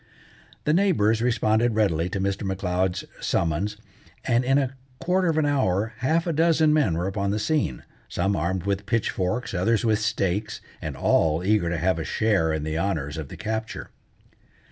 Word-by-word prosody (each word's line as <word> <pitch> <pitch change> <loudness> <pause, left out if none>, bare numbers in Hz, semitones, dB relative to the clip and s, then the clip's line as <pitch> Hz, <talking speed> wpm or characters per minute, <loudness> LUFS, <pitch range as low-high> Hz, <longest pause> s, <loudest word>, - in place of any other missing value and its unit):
The 150 - +2
neighbours 145 - +3
responded 115 -1 +2
readily 90 -6 +1
to 100 - -3
Mr. 100 0 -1
M'Leod's 95 -1 -1 0.2
summons, 85 +6 0 0.5
and 120 +1 +2
in 135 +2 +3
a 135 -2 -1 0.2
quarter 185 +1 +1
of 160 -2 +1
an 155 - +3
hour 110 -7 +1
half 160 +7 +1
a 170 - -1
dozen 160 -1 +3
men 130 - +2
were 85 - -1
upon 100 +1 -1
the 105 - 0
scene, 105 - -1 0.3
some 95 +3 0
armed 85 +3 -1
with 100 0 -2
pitchforks, 110 -1 -1
others 110 +6 +1
with 110 -1 +2
stakes, 105 -1 -1 0.2
and - - -5
all 80 +1 +2
eager 100 -3 +2
to 85 - -1
have 90 +1 +1
a - - -2
share 100 -7 +1
in 80 -1 -2
the 80 +1 -2
honours 80 -7 -2
of 80 -3 -5
the - - -10
capture. 110 +1 -4
105 Hz, 175 wpm, -25 LUFS, 90-120 Hz, 0.5 s, neighbours